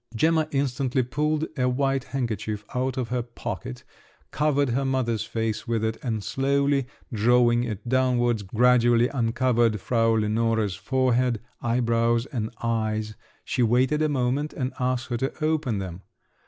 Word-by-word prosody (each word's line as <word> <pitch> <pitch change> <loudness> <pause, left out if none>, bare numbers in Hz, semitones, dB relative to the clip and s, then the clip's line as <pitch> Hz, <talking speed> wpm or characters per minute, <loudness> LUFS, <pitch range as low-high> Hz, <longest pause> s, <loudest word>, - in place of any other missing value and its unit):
Gemma 160 +4 +2
instantly 135 -2 0
pulled 150 +5 0
a 125 -3 +1
white 135 +1 0
handkerchief 110 -5 -3
out 130 +1 -1
of 125 -3 -2
her 125 0 0
pocket, 115 - -6 0.5
covered 145 -2 +1
her 130 +4 0
mother's 120 -5 0
face 110 +1 -3
with 115 -2 0
it, 110 0 -1
and 110 -5 -2
slowly 140 +1 +1 0.3
drawing 120 +2 +3
it 110 -1 -6
downwards, 120 -3 +2
gradually 120 +3 +3
uncovered 120 -3 +1
Frau 115 +2 +2
Lenore's 110 -1 +1
forehead, 125 +1 +1 0.2
eyebrows, 115 0 +1
and 115 -7 -3
eyes; 110 -2 -1 0.3
she 125 - -1
waited 125 +6 +2
a 155 - +2
moment 140 +2 0
and 130 -1 -3
asked 130 0 -1
her 120 - -1
to 135 +5 -2
open 155 -8 0
them. 95 -2 -6
120 Hz, 140 wpm, -25 LUFS, 115-130 Hz, 0.5 s, drawing